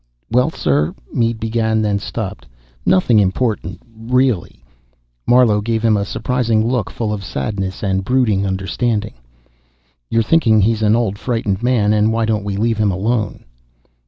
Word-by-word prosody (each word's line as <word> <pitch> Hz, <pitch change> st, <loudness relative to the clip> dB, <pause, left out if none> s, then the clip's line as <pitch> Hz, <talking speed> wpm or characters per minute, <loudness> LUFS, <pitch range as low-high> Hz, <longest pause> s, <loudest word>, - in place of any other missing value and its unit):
"Well, 125 Hz, +5 st, +3 dB
sir 75 Hz, -, 0 dB
" -, -, -23 dB
Mead 115 Hz, -1 st, 0 dB
began, 110 Hz, 0 st, 0 dB
then 100 Hz, -1 st, 0 dB
stopped. -, -, -6 dB, 0.4 s
"Nothing 105 Hz, +4 st, +4 dB
important, 105 Hz, +3 st, -1 dB
really." 125 Hz, -2 st, -1 dB, 0.6 s
Marlowe 120 Hz, -4 st, +4 dB
gave 110 Hz, +1 st, -1 dB
him 110 Hz, -2 st, +4 dB
a 100 Hz, -1 st, 0 dB
surprising 115 Hz, 0 st, 0 dB
look 120 Hz, -5 st, -1 dB
full 110 Hz, -2 st, -3 dB
of 100 Hz, -2 st, -5 dB
sadness 95 Hz, +4 st, -4 dB
and 95 Hz, -1 st, 0 dB
brooding 110 Hz, -4 st, +1 dB
understanding. 105 Hz, +3 st, -2 dB, 1.0 s
"You're 115 Hz, 0 st, +2 dB
thinking 115 Hz, -5 st, +3 dB
he's 110 Hz, +2 st, +1 dB
an 110 Hz, 0 st, +3 dB
old, 105 Hz, -4 st, -1 dB
frightened 115 Hz, -5 st, -2 dB
man, 120 Hz, -4 st, +2 dB
and 105 Hz, +1 st, +2 dB
why 115 Hz, 0 st, 0 dB
don't 110 Hz, -2 st, -1 dB
we 100 Hz, -1 st, -3 dB
leave 115 Hz, +1 st, 0 dB
him 105 Hz, -1 st, +2 dB
alone?" 105 Hz, +3 st, -2 dB
110 Hz, 155 wpm, -18 LUFS, 100-115 Hz, 1.0 s, Nothing